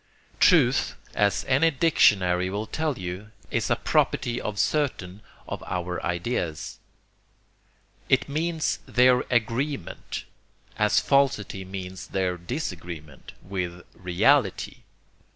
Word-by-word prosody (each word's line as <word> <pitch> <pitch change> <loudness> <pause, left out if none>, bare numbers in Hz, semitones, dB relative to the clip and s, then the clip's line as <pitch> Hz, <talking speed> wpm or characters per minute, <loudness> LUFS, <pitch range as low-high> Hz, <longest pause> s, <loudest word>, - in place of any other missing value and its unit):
Truth, - - +4 0.2
as 100 0 +1
any 140 +5 +4
dictionary 95 - +3
will 105 +3 -3
tell 155 +5 -2
you, 90 +3 -6 0.2
is - - 0
a - - +3
property 120 0 0
of 105 -1 -4
certain 105 -10 -1 0.3
of - - -5
our 90 0 -3
ideas. 85 -3 -3 1.3
It - - +3
means 160 +2 -1
their 125 0 +5
'agreement,' 120 - -2 0.5
as 105 -1 +3
falsity 130 -9 +1
means 95 -1 -7
their 95 -2 -1
disagreement, 85 - -6
with 90 -2 -4
'reality.' 100 +5 +1
100 Hz, 100 wpm, -26 LUFS, 90-130 Hz, 1.3 s, their